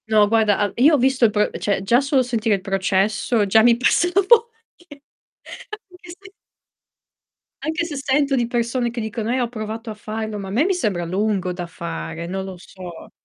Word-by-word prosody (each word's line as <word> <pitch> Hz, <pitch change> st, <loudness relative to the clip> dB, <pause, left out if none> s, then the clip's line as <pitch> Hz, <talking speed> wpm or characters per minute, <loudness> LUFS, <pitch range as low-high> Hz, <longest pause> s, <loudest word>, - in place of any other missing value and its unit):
No 215 Hz, -1 st, +5 dB
guarda, 215 Hz, -2 st, +2 dB
al 205 Hz, -2 st, 0 dB
io 295 Hz, +6 st, +5 dB
ho -, -, +2 dB
visto 260 Hz, -1 st, +3 dB
il 215 Hz, -, +3 dB
pro 210 Hz, 0 st, +1 dB
cioè 200 Hz, -2 st, -1 dB
già 235 Hz, +6 st, +3 dB
solo 275 Hz, -1 st, +2 dB
sentire 230 Hz, -3 st, 0 dB
il 195 Hz, -, -6 dB
processo 200 Hz, +3 st, 0 dB
già 220 Hz, +3 st, +5 dB
mi 235 Hz, +1 st, +5 dB
passa 255 Hz, +8 st, +2 dB
la 395 Hz, -, +4 dB
vogl 465 Hz, +1 st, +6 dB, 0.4 s
anche 285 Hz, -2 st, -17 dB, 0.9 s
se 380 Hz, +3 st, -13 dB, 1.3 s
Anche 320 Hz, +2 st, -1 dB
se, 335 Hz, -, -6 dB
anche 275 Hz, -, -4 dB
se 270 Hz, -, -1 dB
sento 280 Hz, -1 st, +2 dB
di 240 Hz, -2 st, 0 dB
persone 240 Hz, +1 st, -1 dB
che 235 Hz, +1 st, -6 dB
dicono: 220 Hz, 0 st, -4 dB
"Eh, 255 Hz, -, 0 dB
ho 245 Hz, -, 0 dB
provato 225 Hz, 0 st, -6 dB
a -, -, -5 dB
farlo", 215 Hz, 0 st, -5 dB
ma 195 Hz, -, -6 dB
a -, -, -7 dB
me 250 Hz, +10 st, +2 dB
mi 385 Hz, -, +2 dB
sembra 195 Hz, -, -1 dB
lungo 190 Hz, 0 st, -1 dB
da 175 Hz, -1 st, -6 dB
fare, 80 Hz, -, -6 dB
non 190 Hz, +2 st, -4 dB
lo 190 Hz, -1 st, -8 dB
so. 175 Hz, -1 st, -11 dB
220 Hz, 210 wpm, -21 LUFS, 195-260 Hz, 1.3 s, vogl